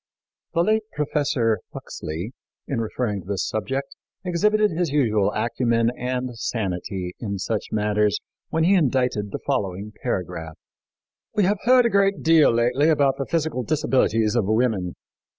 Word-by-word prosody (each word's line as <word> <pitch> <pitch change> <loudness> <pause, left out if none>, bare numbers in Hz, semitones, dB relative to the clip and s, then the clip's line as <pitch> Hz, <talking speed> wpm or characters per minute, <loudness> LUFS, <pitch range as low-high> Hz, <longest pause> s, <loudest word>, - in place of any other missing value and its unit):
The 170 - +4
late 215 +3 +2
Professor 145 -7 +1 0.2
Huxley, 85 +10 -6 0.3
in 130 -5 -1
referring 110 -2 -2
to 90 - -17
this 100 -2 -1
subject, 135 +7 -3 0.3
exhibited 210 +4 +2
his 170 0 0
usual 110 -8 +2
acumen 115 -1 +1
and 125 0 -3
sanity 95 -4 -3
in 100 -4 -3
such 105 +3 -2
matters 105 -1 +1 0.3
when 160 - +1
he 185 +4 +4
indited 125 - +1
the - - -4
following 100 +2 -2
paragraph: 80 -8 -3 0.8
"We 210 - +3
have 200 +2 +2
heard 250 0 +6
a - - +4
great 195 -1 +2
deal 160 -2 +6
lately 125 +6 +2
about 140 -4 +3
the 135 - -2
physical 160 -6 -1
disabilities 125 -6 +1
of 115 -5 +2
women. 110 -5 +1
125 Hz, 145 wpm, -23 LUFS, 105-155 Hz, 0.8 s, heard